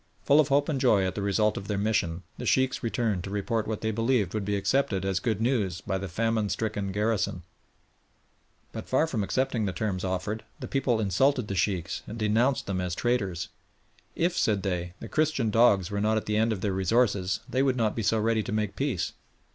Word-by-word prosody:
Full 145 Hz, +2 st, +5 dB
of 150 Hz, -, +4 dB
hope 140 Hz, +1 st, +2 dB
and 140 Hz, -5 st, -1 dB
joy 105 Hz, -7 st, +4 dB
at 95 Hz, -, -1 dB
the 105 Hz, -, -4 dB
result 105 Hz, +2 st, +1 dB
of 100 Hz, -, -6 dB
their 105 Hz, -1 st, -1 dB
mission, 95 Hz, -5 st, 0 dB, 0.2 s
the -, -, -4 dB
Sheikhs 130 Hz, 0 st, +2 dB
returned 115 Hz, -6 st, -1 dB
to 95 Hz, -, -6 dB
report 105 Hz, +2 st, -1 dB
what 110 Hz, -1 st, -3 dB
they 110 Hz, -, 0 dB
believed 115 Hz, -3 st, +1 dB
would 105 Hz, -2 st, -2 dB
be 105 Hz, 0 st, 0 dB
accepted 100 Hz, -2 st, 0 dB
as 95 Hz, -2 st, 0 dB
good 110 Hz, -3 st, -1 dB
news 110 Hz, -7 st, 0 dB
by 95 Hz, -1 st, -3 dB
the 95 Hz, -, -4 dB
famine 110 Hz, +3 st, 0 dB
stricken 105 Hz, -3 st, -2 dB
garrison. 105 Hz, -3 st, -1 dB, 1.3 s
But -, -, -7 dB
far 130 Hz, +5 st, +3 dB
from 120 Hz, -10 st, -2 dB
accepting 120 Hz, 0 st, 0 dB
the 95 Hz, -, -1 dB
terms 95 Hz, -3 st, -2 dB
offered, 95 Hz, +4 st, -2 dB, 0.2 s
the -, -, -6 dB
people 130 Hz, -4 st, +1 dB
insulted 125 Hz, +4 st, +2 dB
the -, -, -1 dB
Sheikhs 90 Hz, -3 st, -1 dB
and 110 Hz, -, -6 dB
denounced 115 Hz, +5 st, +1 dB
them 95 Hz, -2 st, -2 dB
as 90 Hz, -1 st, -2 dB
traitors. 100 Hz, -8 st, -1 dB, 0.7 s
"If," 175 Hz, +2 st, +1 dB
said 105 Hz, -, +1 dB
they, 90 Hz, -2 st, -3 dB
"the -, -, -7 dB
Christian 150 Hz, -8 st, +1 dB
dogs 105 Hz, -6 st, +4 dB
were 100 Hz, 0 st, -1 dB
not 110 Hz, +1 st, +2 dB
at 110 Hz, -, -2 dB
the 105 Hz, -, -1 dB
end 110 Hz, +1 st, +2 dB
of 100 Hz, -4 st, -3 dB
their 100 Hz, -1 st, 0 dB
resources 95 Hz, -1 st, +1 dB
they 130 Hz, -, 0 dB
would 135 Hz, -2 st, +2 dB
not 110 Hz, -3 st, +1 dB
be 115 Hz, -, -2 dB
so 110 Hz, +1 st, +2 dB
ready 110 Hz, 0 st, +1 dB
to -, -, -5 dB
make 105 Hz, -2 st, -1 dB
peace." 125 Hz, -, -1 dB
110 Hz, 215 wpm, -27 LUFS, 95-120 Hz, 1.3 s, Full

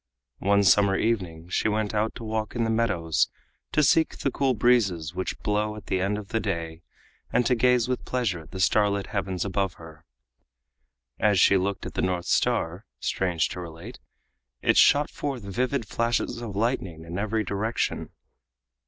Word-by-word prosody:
One 100 Hz, +1 st, +3 dB
summer 100 Hz, 0 st, +5 dB
evening 90 Hz, -7 st, -1 dB
she 90 Hz, -, +1 dB
went 110 Hz, 0 st, -1 dB
out 110 Hz, +1 st, 0 dB
to 120 Hz, -, -8 dB
walk 110 Hz, +1 st, -3 dB
in 120 Hz, -, +1 dB
the 115 Hz, -, 0 dB
meadows 95 Hz, -8 st, +1 dB, 0.4 s
to 150 Hz, -, +3 dB
seek 160 Hz, +3 st, +3 dB
the 135 Hz, -, -1 dB
cool 135 Hz, -1 st, +1 dB
breezes 95 Hz, -9 st, +2 dB
which 95 Hz, +1 st, -3 dB
blow 105 Hz, +1 st, 0 dB
at 105 Hz, -1 st, -10 dB
the 95 Hz, -1 st, -1 dB
end 100 Hz, +2 st, 0 dB
of 105 Hz, -1 st, -8 dB
the 115 Hz, -, 0 dB
day 85 Hz, -5 st, -3 dB, 0.5 s
and 125 Hz, -, +2 dB
to 125 Hz, -, +3 dB
gaze 125 Hz, 0 st, +3 dB
with 125 Hz, 0 st, -2 dB
pleasure 120 Hz, -9 st, -1 dB
at 80 Hz, -, -14 dB
the 95 Hz, -, -7 dB
star 105 Hz, +2 st, +3 dB
lit 100 Hz, -1 st, -2 dB
heavens 95 Hz, -3 st, -2 dB
above 95 Hz, -2 st, -1 dB
her. 80 Hz, -1 st, -13 dB, 1.2 s
As 105 Hz, -3 st, +3 dB
she 100 Hz, -, +6 dB
looked 95 Hz, +1 st, -1 dB
at -, -, -6 dB
the -, -, -1 dB
North 90 Hz, -2 st, -1 dB
Star, 100 Hz, -6 st, 0 dB
strange 90 Hz, -4 st, 0 dB
to -, -, -6 dB
relate, 85 Hz, +7 st, -9 dB, 0.6 s
it -, -, +3 dB
shot 145 Hz, +1 st, +5 dB
forth 135 Hz, -6 st, -4 dB
vivid 120 Hz, +5 st, -1 dB
flashes 120 Hz, 0 st, -1 dB
of 110 Hz, -4 st, -6 dB
lightning 95 Hz, -8 st, -2 dB
in 85 Hz, +3 st, -5 dB
every 110 Hz, +1 st, 0 dB
direction. 105 Hz, +3 st, -2 dB
105 Hz, 180 wpm, -26 LUFS, 90-115 Hz, 1.2 s, she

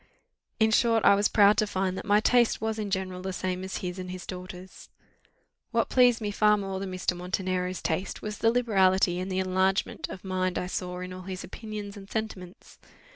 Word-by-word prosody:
In 220 Hz, 0 st, +4 dB
short, 230 Hz, -1 st, +3 dB
I -, -, +8 dB
was 205 Hz, +1 st, +3 dB
proud 205 Hz, 0 st, +5 dB
to 215 Hz, -, +2 dB
find 190 Hz, -2 st, -1 dB
that -, -, -6 dB
my 205 Hz, 0 st, +5 dB
taste 240 Hz, +1 st, +3 dB
was 220 Hz, 0 st, -2 dB
in 210 Hz, -1 st, -3 dB
general 185 Hz, -1 st, -3 dB
the 190 Hz, +1 st, -3 dB
same 185 Hz, 0 st, -3 dB
as 190 Hz, -, -4 dB
his 180 Hz, +1 st, -4 dB
and 185 Hz, 0 st, -6 dB
his 185 Hz, -1 st, -7 dB
daughter's. 185 Hz, 0 st, -9 dB, 0.8 s
What -, -, 0 dB
pleased 245 Hz, -3 st, +4 dB
me 210 Hz, -1 st, -2 dB
far 210 Hz, +1 st, +4 dB
more 195 Hz, -1 st, -4 dB
than 195 Hz, -1 st, -5 dB
Mr. 185 Hz, -1 st, -1 dB
Montenero's 185 Hz, 0 st, -2 dB
taste, 170 Hz, +4 st, -2 dB
was 210 Hz, -1 st, -6 dB
the 225 Hz, -, +4 dB
liberality 190 Hz, -6 st, +3 dB
and 185 Hz, +1 st, -4 dB
the 185 Hz, -, -1 dB
enlargement 190 Hz, +1 st, 0 dB
of 185 Hz, -, -8 dB
mind 185 Hz, -1 st, -1 dB
I -, -, -1 dB
saw 180 Hz, 0 st, -4 dB
in 180 Hz, 0 st, -6 dB
all 185 Hz, -, -8 dB
his 185 Hz, 0 st, -6 dB
opinions 210 Hz, -2 st, -7 dB
and 195 Hz, 0 st, -11 dB
sentiments. 195 Hz, -5 st, -6 dB
190 Hz, 205 wpm, -27 LUFS, 185-210 Hz, 0.8 s, I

